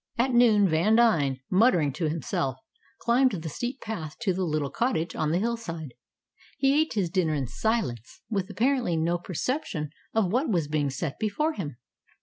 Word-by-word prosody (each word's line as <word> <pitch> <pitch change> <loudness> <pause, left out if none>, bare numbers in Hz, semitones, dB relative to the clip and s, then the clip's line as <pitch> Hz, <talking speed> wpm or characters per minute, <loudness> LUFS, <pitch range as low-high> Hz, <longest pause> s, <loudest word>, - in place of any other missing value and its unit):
At 250 +2 +2
noon 220 -4 +5
Vandine, 165 - +3
muttering 185 - +4
to 160 +1 -1
himself, 135 -4 -2 0.4
climbed 250 +1 +3
the 165 -3 -4
steep 245 - -4
path 165 -9 -5
to 200 -6 +1
the 185 - -3
little 150 -4 -1
cottage 230 -9 -1
on 155 - 0
the 165 - +2
hillside. 180 - -3 0.6
He 270 0 +3
ate 315 - -1
his 190 -6 -1
dinner 170 -4 +1
in 140 -2 -1
silence, 130 - -2
with 200 -3 -2
apparently 235 -3 +1
no 170 +2 +1
perception 180 - -3 0.2
of 205 -5 +2
what 260 +7 +1
was 170 -8 +1
being 150 -1 0
set 135 +2 -4
before 265 +10 0
him. 150 - -5
185 Hz, 165 wpm, -27 LUFS, 155-235 Hz, 0.6 s, noon